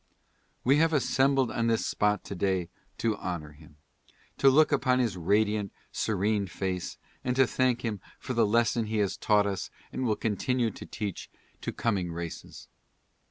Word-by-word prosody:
We 135 +3 +4
have 165 +1 +3
assembled 135 -3 +2
on 115 0 0
this 115 -1 +1
spot 105 0 +1
to - - -6
day 95 -2 0 0.3
to 115 -2 0
honor 85 -6 -4
him 75 0 -17 0.3
— - - -32
to 135 - +7
look 155 +4 +5
upon 130 -3 +3
his 120 -6 +1
radiant, 105 +3 +1 0.2
serene 105 0 0
face, 90 -1 -3 0.3
and 125 0 0
to 135 0 +5
thank 125 -1 +1
him 105 -4 -2 0.2
for 130 - -5
the 115 -3 +3
lesson 115 +1 +2
he 110 0 -2
has 100 -2 +1
taught 105 -1 +3
us 100 -2 -3 0.2
and - - -2
will 110 -4 +2
continue 115 +3 0
to - - -10
teach 105 -4 -5 0.3
to - - -3
coming 95 -7 -1
races. 85 0 -7
110 Hz, 170 wpm, -29 LUFS, 95-125 Hz, 0.3 s, to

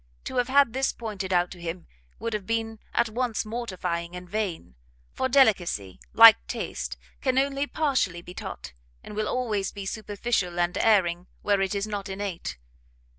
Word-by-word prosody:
To 260 - -5
have 245 -1 +2
had 275 -3 +4
this 265 +1 +1
pointed 205 -5 -5
out 175 -1 +2
to 175 - -10
him, 170 +1 -5 0.3
would 230 +2 -3
have 210 -3 -3
been 225 -1 -2
at 235 - +2
once 230 0 -1
mortifying 185 -7 -3
and 180 0 -8
vain; 185 - -3 0.4
for 260 - -1
delicacy, 185 - +3
like 225 -1 +10
taste, - - -4 0.2
can 260 -2 +1
only 275 +1 +1
partially 260 - 0
be 180 - -10
taught, - - -7 0.3
and - - -9
will 215 0 -1
always 215 -6 -1
be 200 -1 -7
superficial 205 -3 -2
and 175 0 +1
erring 180 -5 +3 0.2
where 200 -1 +2
it 195 +1 0
is 200 0 0
not 205 -2 -4
innate. 190 - -4
210 Hz, 170 wpm, -26 LUFS, 180-235 Hz, 0.4 s, like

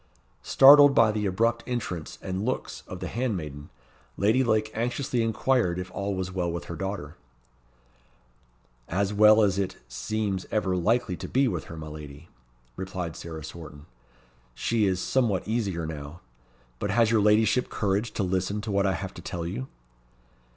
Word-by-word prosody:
Startled 145 +1 +8
by 115 -2 +5
the 105 -1 -1
abrupt 115 +5 +1
entrance 100 -10 -4
and 95 +1 -3
looks 130 +3 -3
of - - -8
the - - -3
handmaiden, 85 - -4 0.5
Lady 110 +6 +3
Lake 110 -2 +1
anxiously 120 +2 -1
inquired 115 -4 +1
if 90 0 -5
all 100 0 -3
was 95 -1 -3
well 90 -2 -1
with 85 0 -4
her 85 - -6
daughter. 95 -5 -5 1.7
"As 100 +3 0
well 105 +1 +6
as 100 -1 +2
it, 95 -2 -2
seems 95 - -3
ever 95 -4 0
likely 95 +2 +1
to - - -6
be 135 +1 +2
with 90 -9 -3
her, 80 - -9
my 80 - -7
lady," 75 -2 -10 0.5
replied 90 -3 -5
Sarah 80 -2 -8
Swarton. 75 -2 -10 0.7
"She 110 - +1
is 95 -1 0
somewhat 110 -5 0
easier 100 -7 -1
now. 75 +1 -7 0.6
But - - -2
has 115 -2 +3
your 110 -2 +4
ladyship 105 +3 +3
courage 105 +2 -1
to 100 - -1
listen 95 +2 -1
to 110 0 -5
what 100 0 +2
I 95 - +2
have 85 - -5
to - - -10
tell 85 -1 -5
you?" 115 +10 -4
100 Hz, 165 wpm, -26 LUFS, 85-110 Hz, 1.7 s, Startled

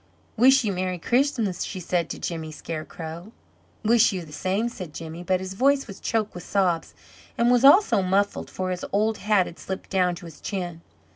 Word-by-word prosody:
"Wish 265 +3 +6
you 210 - 0
Merry 185 -1 -2
Christmas!" 235 - 0
she 190 - -5
said 175 -1 -1
to - - -5
Jimmy 160 -2 -4
Scarecrow. 160 +4 -7 0.5
"Wish 230 +1 +5
you 185 -4 -4
the 155 - -14
same," 190 +8 -1
said 185 -10 -8
Jimmy, 165 +1 -7
but 185 +1 +1
his 190 0 -6
voice 275 +6 +2
was 195 -2 -10
choked 220 -2 -1
with 180 - -7
sobs, 180 -5 0 0.4
and 235 +1 +3
was 245 0 +4
also 275 - +6
muffled, 195 +2 0
for 185 0 -3
his 180 - -4
old 215 +2 +1
hat 205 -3 +3
had 170 - -10
slipped 190 0 -6
down 180 -2 +2
to 175 - -11
his 160 -3 -12
chin. 175 -4 -4
190 Hz, 195 wpm, -25 LUFS, 175-220 Hz, 0.5 s, Wish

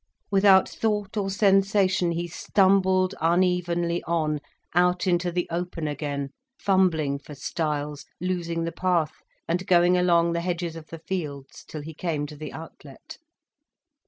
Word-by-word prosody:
Without 195 -1 +6
thought 210 -2 -2
or 200 -2 -1
sensation, 195 -2 +3
he 170 +1 -3
stumbled 190 +1 +2
unevenly 175 0 +1
on, 155 -3 0 0.3
out 180 +2 +2
into 175 -1 +1
the 175 0 -1
open 170 -2 -3
again, 145 -1 -3 0.3
fumbling 165 -8 +2
for 145 +1 -11
stiles, 150 0 -3 0.2
losing 170 -2 -2
the 165 - -2
path, 175 -4 0 0.3
and 180 +2 -1
going 175 0 +5
along 170 -1 +3
the 170 - -1
hedges 170 -1 -3
of 160 -1 -10
the 165 - -8
fields 150 -6 -6
till 155 -2 -8
he 160 +2 -8
came 155 -2 -2
to 150 +1 -9
the 155 +1 -7
outlet. 150 -3 -11
170 Hz, 140 wpm, -25 LUFS, 155-185 Hz, 0.3 s, Without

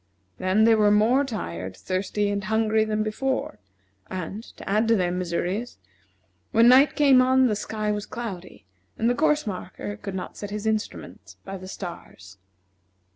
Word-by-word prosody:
Then 190 +4 +2
they 225 0 +6
were 210 -1 +4
more 220 +7 +4
tired, 95 - -5
thirsty, 200 +2 -1
and 200 -1 -2
hungry 220 0 +2
than 215 0 -1
before; 260 +5 -2 0.5
and, 185 +3 -5 0.2
to - - -11
add 215 +3 +2
to 230 - +4
their 180 -3 +1
miseries, 180 +5 -2 0.7
when 230 +1 +5
night 270 +3 +6
came 275 -4 +6
on 260 +1 +4
the 220 -4 +2
sky 210 0 -3
was 210 0 -3
cloudy, 190 - -7 0.3
and 225 - +1
the - - +2
course 300 +2 +2
marker 205 0 -6
could 195 -2 -6
not 185 - -6
set 205 - -6
his 210 +1 -5
instrument 220 -1 -4
by 195 - -6
the 185 -1 -9
stars. 95 - -9
210 Hz, 165 wpm, -25 LUFS, 185-230 Hz, 0.7 s, they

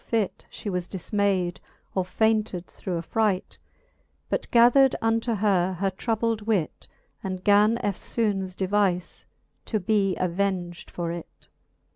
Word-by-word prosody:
fit, 220 -5 -1
She - - -9
was 180 -3 -2
difmayd, 190 -2 0 0.4
or 190 - +1
faynted 215 -1 0
through 180 -1 -5
affright. 195 +3 -1 0.7
But - - -2
gathered 245 +3 +6
unto 225 +1 +1
her 190 -3 +2
her 190 +2 -1
troubled 225 +2 -1
wit, 205 -7 -1 0.4
And 185 -1 -4
gan 210 +2 +5
eftlbones 200 -2 -1
devize 190 -2 0 0.4
to 215 - -1
be 195 -1 +1
aveng'd 180 -1 -2
for 170 -1 -3
it. 170 -1 -9
200 Hz, 120 wpm, -26 LUFS, 180-220 Hz, 0.7 s, gathered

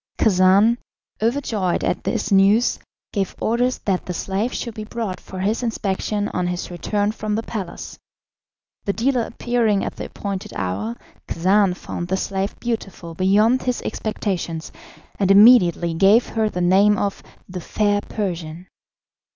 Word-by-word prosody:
Khacan, 200 +3 +4 0.4
overjoyed 220 -6 0
at - - -1
this 225 -3 -1
news, 200 +4 +4 0.3
gave 195 -3 -2
orders 245 +3 +1
that 190 -3 -1
the 180 - -3
slave 200 +8 -2
should 235 - -4
be 215 - -6
brought 215 -3 -4
for 190 - -10
his 210 +5 0
inspection 210 -2 -2
on 180 -1 -2
his 180 0 -4
return 205 +4 -1
from 215 -1 -3
the 225 - -2
palace. 195 -8 -6 0.9
The 200 - 0
dealer 250 +3 +1
appearing 230 -3 0
at - - -6
the - - -5
appointed 200 -2 -5
hour, 100 +5 -3 0.3
Khacan 190 +2 +2
found 175 -1 -6
the 190 +1 0
slave 195 +1 -3
beautiful 195 -8 -4
beyond 210 +8 +3
his 250 -1 -1
expectations, 180 -6 -3 0.5
and 195 -2 +2
immediately 195 -5 +6
gave 200 +8 +4
her 220 -1 0
the 180 - -3
name 195 +4 +4
of 200 -1 -2 0.3
"The 180 -1 -6
Fair 205 +3 0
Persian." 175 -6 -5
200 Hz, 145 wpm, -21 LUFS, 185-220 Hz, 0.9 s, immediately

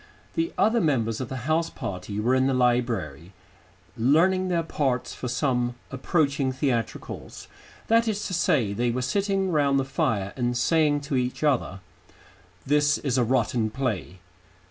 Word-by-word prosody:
The 330 +1 -1
other 230 +2 +3
members 120 - 0
of 130 - -5
the 130 -2 -6
house 165 +2 +1
party 100 +2 -5
were 120 +4 +1
in 130 0 +3
the 135 - +1
library, 115 - 0 0.6
learning 175 +10 +3
their 170 -2 0
parts 135 -6 -1
for 125 - -5
some 125 -1 0 0.2
approaching 140 -1 0
theatricals 130 -4 -3 0.4
that 230 +1 +3
is 210 -1 -1
to 185 - -4
say, 125 - +1
they 120 +4 0
were 125 +2 -1
sitting 195 +5 0
round 140 -3 +2
the 135 - -1
fire 105 -7 -1
and 120 -1 -1
saying 150 +2 +2
to 140 -1 -2
each 125 +3 -2
other, 125 -10 0 0.8
"This 145 +1 +3
is 135 -3 -1
a - - +3
rotten 120 -2 +1
play." 110 -7 -3
130 Hz, 155 wpm, -25 LUFS, 120-155 Hz, 0.8 s, other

